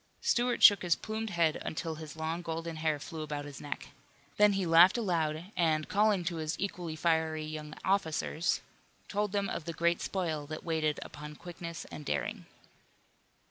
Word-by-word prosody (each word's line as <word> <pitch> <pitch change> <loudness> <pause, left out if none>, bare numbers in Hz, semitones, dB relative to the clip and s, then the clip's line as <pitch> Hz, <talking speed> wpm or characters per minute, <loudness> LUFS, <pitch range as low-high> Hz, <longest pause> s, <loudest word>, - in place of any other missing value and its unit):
Stuart 245 0 +1
shook 205 -3 +9
his 175 -2 +3
plumed 220 0 -4
head 170 -4 +1
until 160 +1 -3
his 155 -1 -8
long 160 +2 -2
golden 165 -1 -4
hair 155 -1 +1
flew 160 +2 -7
about 150 -1 -4
his 145 -2 -9
neck. 145 - -6 0.5
Then 210 0 +6
he 195 -1 0
laughed 170 +5 +7
aloud 170 -4 -1
and 155 -3 +2
calling 210 -2 +3
to 170 -1 -2
his 155 0 -2
equally 175 -5 -3
fiery 160 -1 +1
young 155 0 -6
officers, 165 -3 +1 0.5
told 205 0 -1
them 200 -1 0
of 165 - -4
the 170 - -4
great 170 +2 +1
spoil 160 -6 -2
that 155 0 -6
waited 160 -3 0
upon 150 0 -9
quickness 170 0 -7
and 150 - -7
daring. - - -2
165 Hz, 170 wpm, -31 LUFS, 155-180 Hz, 0.5 s, shook